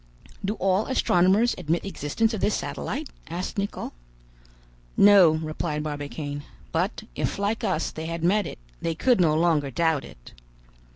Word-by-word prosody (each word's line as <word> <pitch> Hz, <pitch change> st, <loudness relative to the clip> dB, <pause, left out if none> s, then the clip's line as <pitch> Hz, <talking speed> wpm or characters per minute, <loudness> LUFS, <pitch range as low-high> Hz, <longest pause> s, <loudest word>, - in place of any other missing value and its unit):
"Do 200 Hz, +3 st, -1 dB
all 195 Hz, +1 st, +1 dB
astronomers 205 Hz, -2 st, +3 dB
admit 170 Hz, 0 st, 0 dB
the -, -, -5 dB
existence 215 Hz, -, -1 dB
of 215 Hz, -, -3 dB
this 210 Hz, -, +2 dB
satellite?" 290 Hz, +3 st, -4 dB, 0.2 s
asked 180 Hz, +5 st, -3 dB
Nicholl. 200 Hz, +1 st, -4 dB, 1.0 s
"No," 200 Hz, -4 st, +8 dB
replied 155 Hz, -1 st, -3 dB
Barbicane; 145 Hz, -1 st, -4 dB, 0.3 s
"but -, -, -1 dB
if, -, -, -2 dB
like 205 Hz, +3 st, -1 dB
us, 155 Hz, -, 0 dB
they 160 Hz, +1 st, -6 dB
had 165 Hz, 0 st, -4 dB
met 205 Hz, +4 st, +3 dB
it, -, -, -7 dB, 0.2 s
they 165 Hz, -1 st, -1 dB
could 245 Hz, +3 st, +3 dB
no 155 Hz, -3 st, +4 dB
longer 155 Hz, -4 st, +2 dB
doubt 160 Hz, +1 st, +1 dB
it. -, -, -13 dB
170 Hz, 155 wpm, -25 LUFS, 155-205 Hz, 1.0 s, No